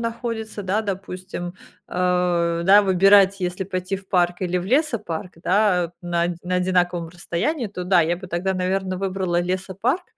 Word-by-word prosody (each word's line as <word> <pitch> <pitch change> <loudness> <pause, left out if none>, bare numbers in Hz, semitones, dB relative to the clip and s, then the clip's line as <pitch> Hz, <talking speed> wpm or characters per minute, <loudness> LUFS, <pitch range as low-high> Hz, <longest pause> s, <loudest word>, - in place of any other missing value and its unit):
находится, 230 -2 -4
да, 200 +4 0
допустим. 185 -2 -5 0.3
Э, 180 -2 +1
да, 200 +2 +7
выбирать, 195 +1 +5
если 180 +1 -2
пойти 185 +1 -3
в 190 0 -14
парк 175 -1 +2
или 180 0 0
в 175 - -4
лесопарк, 215 - -1
да, 185 -2 +3
э, - - -5
на 175 -1 -1
оди 175 0 -1
на 180 +1 -1
одинаковом 180 -2 +1
расстоянии, 190 - -2
то 180 -3 -6
да, 180 -1 +4
я 170 +1 +1
бы 185 +1 -9
тогда, 180 +2 -1
наверное, 185 0 -1
выбрала 185 -2 -1
лесопарк. 190 - -1
185 Hz, 165 wpm, -22 LUFS, 175-200 Hz, 0.3 s, да